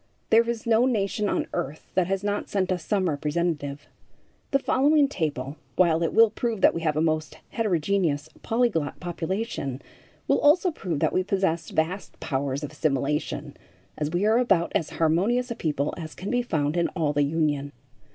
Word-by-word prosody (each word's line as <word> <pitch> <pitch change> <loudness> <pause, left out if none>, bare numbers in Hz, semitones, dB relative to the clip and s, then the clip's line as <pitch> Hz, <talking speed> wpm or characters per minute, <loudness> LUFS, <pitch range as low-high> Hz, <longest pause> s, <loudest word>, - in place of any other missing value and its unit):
There 230 +1 +5
is 235 -2 -3
no 230 +2 +4
nation 210 -3 0
on - - 0
earth 145 +4 -4
that 185 -2 +2
has 195 +1 -1
not 205 0 -2
sent 190 -2 0
us 180 -3 -1
some 195 -1 0
representative. 150 -1 -2 0.6
The 275 - +3
following 285 +2 +3
table, 150 - -3 0.2
while 170 -3 +3
it 165 - +1
will 225 -1 +6
prove 225 -2 -2
that - - +6
we 165 - -3
have 155 -2 0
a - - +2
most 155 -1 -1
heterogeneous, 175 -7 0
polyglot 225 -11 0
population, 175 - -3 0.5
will - - +3
also 345 +5 +4
prove 175 - -4
that - - +2
we 185 - +2
possess 185 -4 0
vast 175 +5 -2
powers 140 0 -2
of 150 - -5
assimilation, 150 -1 -1 0.4
as 150 -1 -2
we 175 +5 0
are 220 +3 +4
about 195 -9 +2
as 160 - 0
harmonious 200 +11 +1
a - - -2
people 150 -5 -1
as 160 -2 -7
can 190 - -5
be 245 0 +2
found 155 -8 -1
in 170 - +2
all 155 -4 +1
the 145 - +2
Union. 145 -1 0
170 Hz, 180 wpm, -26 LUFS, 150-215 Hz, 0.6 s, will